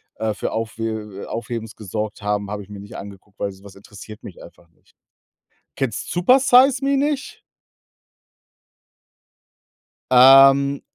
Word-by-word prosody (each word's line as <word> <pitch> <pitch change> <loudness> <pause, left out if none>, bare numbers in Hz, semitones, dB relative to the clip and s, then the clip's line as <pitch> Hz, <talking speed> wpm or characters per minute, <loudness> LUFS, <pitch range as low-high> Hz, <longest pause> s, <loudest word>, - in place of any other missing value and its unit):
äh, 110 -1 -2
für - - -5
Aufhe 110 -2 -5
Aufhebens 115 -1 -6
gesorgt 105 +1 -6
haben, 105 -1 -2
habe 105 -1 -6
ich 100 - -19
mir 100 -1 -10
nicht 100 - -11
angeguckt, 100 0 -12
weil 100 - -3
so 95 +1 -17
was 100 - -13
interessiert 105 +2 -13
mich - - -12
einfach 85 - -17
nicht. - - -33 0.8
Kennst 135 -4 -4
„Supersize 255 +7 +4
Me“ 275 0 +1
nicht? 285 0 -3 2.7
Ähm, 135 +2 +6
110 Hz, 125 wpm, -20 LUFS, 100-140 Hz, 2.7 s, Ähm